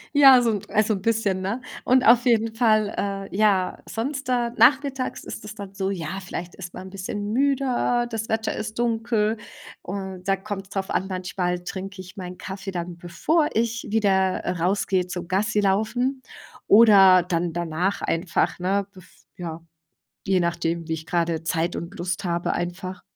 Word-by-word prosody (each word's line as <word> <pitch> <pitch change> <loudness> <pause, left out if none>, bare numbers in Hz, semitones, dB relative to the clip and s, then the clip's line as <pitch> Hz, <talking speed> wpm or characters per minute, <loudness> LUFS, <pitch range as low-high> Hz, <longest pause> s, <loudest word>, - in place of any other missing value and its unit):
Ja, 270 -3 +8
so 235 - +2
'n 205 - -2
also 215 +1 +2
'n 190 - -6
bisschen, 210 -4 +1
ne? 200 +7 -2 0.2
Und 255 0 +4
auf 240 +2 +6
jeden 225 -2 +2
Fall, 215 -3 +3 0.4
äh, - - -8
ja, 200 -3 +2
sonst 270 +4 -4
da 245 -2 +1
nachmittags 270 -1 +3
ist - - -8
es 210 - -7
dann 200 -2 -8
so, 195 0 -1
ja, 175 0 -4
vielleicht 180 -2 -7
ist 180 -2 -8
man 190 - -8
'n - - -9
bisschen 205 +2 -4
müder, 255 -2 +1
das 225 -1 -4
Wetter 220 0 -1
ist 220 +1 -5
dunkel. 225 -2 +1 0.5
Und 190 -1 -6
da 195 - +3
kommt's 195 0 -6
drauf 195 -1 -3
an, 190 - -1
manchmal 180 -1 -2
trinke 190 +2 -6
ich 185 +1 -13
meinen 180 -1 -7
Kaffee 195 0 -6
dann, 175 -1 -5
bevor 295 - 0
ich 230 +1 -1
wieder, 190 -3 +2
äh, - - 0
rausgehe 185 +1 0
zum 180 -1 -6
Gassilaufen 215 +6 0 0.4
oder 200 -4 +7
dann 175 -1 -1
danach 175 +3 -1
einfach, 165 +1 0
ne? 195 +2 0
Bev 185 -3 -15 0.3
ja, 170 -2 -6 0.7
je 190 -1 +3
nachdem, 170 -1 -1
wie - - -1
ich 160 0 -7
gerade 170 -2 0
Zeit 165 +1 -1
und 170 +4 -7
Lust 175 0 -2
habe 170 -1 -1
einfach. 180 +1 -4
195 Hz, 170 wpm, -24 LUFS, 180-225 Hz, 0.7 s, Ja